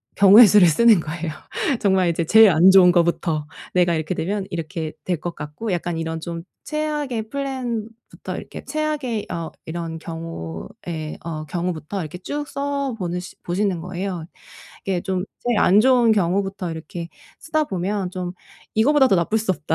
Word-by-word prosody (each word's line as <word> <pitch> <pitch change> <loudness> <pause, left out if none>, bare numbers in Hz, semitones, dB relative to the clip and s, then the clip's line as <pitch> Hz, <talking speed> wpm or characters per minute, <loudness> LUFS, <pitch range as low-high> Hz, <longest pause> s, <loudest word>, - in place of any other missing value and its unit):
경우의 205 +4 +9
수를 200 -2 +6
쓰는 215 +5 +5
거예요. 160 +1 -4 0.5
정말 190 -3 +3
이제 170 0 0
제일 220 +4 +7
안 175 +4 +6
좋은 185 -2 +7
것부터 170 -3 +1 0.3
내가 175 -1 +3
이렇게 160 +2 -2
되면 190 +5 -2
이렇게 165 -2 -4
될 180 -4 -1
것 175 +1 -5
같고 150 +9 -5
약간 175 -1 -2
이런 160 0 -3
좀 165 0 -5 0.2
최악의 295 -7 -2
플랜부터 240 -5 -5
이렇게 - - -8
최악의 295 -8 -2
어 165 -1 -4
이런 165 0 -5
경우에 160 - -7
어 155 -2 -4
경우부터 175 +2 -3
이렇게 160 +1 -6
쭉 290 +10 -4
써 280 -2 -2
보는 180 -1 -2
시 180 - -11
보시는 185 0 -1
거예요. 180 -1 -4 0.6
이게 190 -2 0
좀 185 -1 -2 0.2
제일 240 -3 0
안 200 +2 +5
좋은 245 -1 +4
경우부터 195 -1 0
이렇게 165 +1 -7 0.3
쓰다 310 -1 0
보면 190 -3 -2
좀 180 -1 -4 0.4
이것보다 265 +5 +4
더 195 - +4
나쁠 170 +5 +1
수 220 -2 -1
없다. 160 -2 -2
185 Hz, 330 characters per minute, -22 LUFS, 165-220 Hz, 0.6 s, 경우의